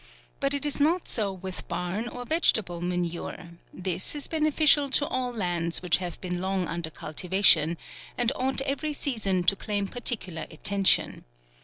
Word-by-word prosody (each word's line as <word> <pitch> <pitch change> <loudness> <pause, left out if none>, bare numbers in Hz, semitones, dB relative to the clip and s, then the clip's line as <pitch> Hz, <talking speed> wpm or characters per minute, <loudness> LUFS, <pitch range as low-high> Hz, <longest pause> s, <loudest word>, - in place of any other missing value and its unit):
But 275 0 +3
it 285 - -2
is 295 - 0
not 325 +5 +1
so 210 -4 0
with 190 0 -7
barn 180 +6 -3
or 245 +1 -7
vegetable 220 - +1
manure; 175 0 -4 0.2
this 185 - -2
is 290 - -1
beneficial 305 -2 +3
to 285 +2 +2
all 255 -2 -2
lands 175 -6 -2
which 175 -2 +4
have 180 -2 -6
been 180 -1 -4
long 190 -2 -1
under 170 -1 -3
cultivation, 170 0 +3 0.4
and 245 0 +2
ought 265 +1 +1
every 280 +3 -2
sea 280 -5 -2
son 190 -3 +1
to 190 +3 +4
claim 205 -1 -3
particular 205 -8 -3
attention. 195 +5 +2
195 Hz, 160 wpm, -26 LUFS, 175-270 Hz, 0.4 s, which